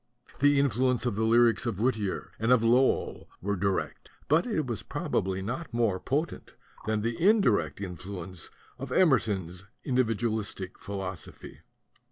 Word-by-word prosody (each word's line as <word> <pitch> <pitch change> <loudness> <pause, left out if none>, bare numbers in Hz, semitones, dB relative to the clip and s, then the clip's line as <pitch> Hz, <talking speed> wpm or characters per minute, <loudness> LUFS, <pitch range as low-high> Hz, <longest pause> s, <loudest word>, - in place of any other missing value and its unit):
The 145 0 +5
influence 130 -1 +1
of 120 -5 0
the 110 +1 0
lyrics 115 0 +4
of 110 -5 -2
Whittier 110 -5 -1
and 115 +3 +1
of 125 -3 +5
Lowell 125 +3 +2
was 100 +1 -2
direct; 95 +1 -2 0.2
but 160 - +3
it 185 - 0
was 120 -4 -3
probably 95 0 -2
not 125 - -4
more 115 -6 +1
potent 150 - -3 0.3
than 110 -1 +1
the 115 +4 -2
indirect 115 - +3
influence 90 -1 -6 0.3
of 135 0 -6
Emerson's 100 - +2 0.2
individualize 115 -4 0 0.2
philosophy. 95 -4 -7
115 Hz, 135 wpm, -28 LUFS, 100-130 Hz, 0.3 s, The